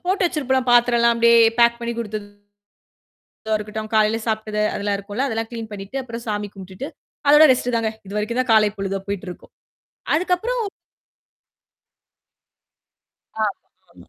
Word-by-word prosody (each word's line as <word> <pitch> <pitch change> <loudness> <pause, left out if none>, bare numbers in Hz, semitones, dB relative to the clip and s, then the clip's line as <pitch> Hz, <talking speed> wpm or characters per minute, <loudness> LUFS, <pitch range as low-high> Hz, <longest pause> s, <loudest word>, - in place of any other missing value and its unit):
போட்டு 385 +2 +1
வச்சிருப்போம்ல 265 -6 0
பாத்திரம்ல்லாம் 235 -1 +4
அப்படியியே 235 0 +5 0.2
பேக் 235 0 +5
பண்ணி 235 0 -3
குடுத்தது 215 -2 -4 1.2
இத 220 0 -1
இருக்கட்டும். 215 +1 -6
காலையில 215 +1 +3
சாப்ட்டது 215 -1 -1
அதெல்லாம் 205 0 -1
இருக்கும்ல 205 +7 -3
அதெல்லாம் 225 -1 -3
கிளீன் 225 -2 -6
பண்ணிட்டு, 200 +5 -7
அப்புறம் 235 -1 -8
சாமி 210 -1 -2
கும்பிட்டுட்டு, 190 +7 -8 0.4
அதோட 295 +2 +8
ரெஸ்ட்டு 245 -1 -1
தாங்க. 225 -1 0 0.2
இதுவரைக்கும் 210 +4 -2
தான் 250 - -4
காலை 215 -1 +5
பொழுதா 195 0 -2
போயிட்டு 200 0 -4
இருக்கும். - - -13 0.6
அதுக்கப்புறம் 375 +8 0 2.8
ஆமாமா. 185 -3 -8
225 Hz, 130 wpm, -21 LUFS, 210-240 Hz, 2.8 s, அதோட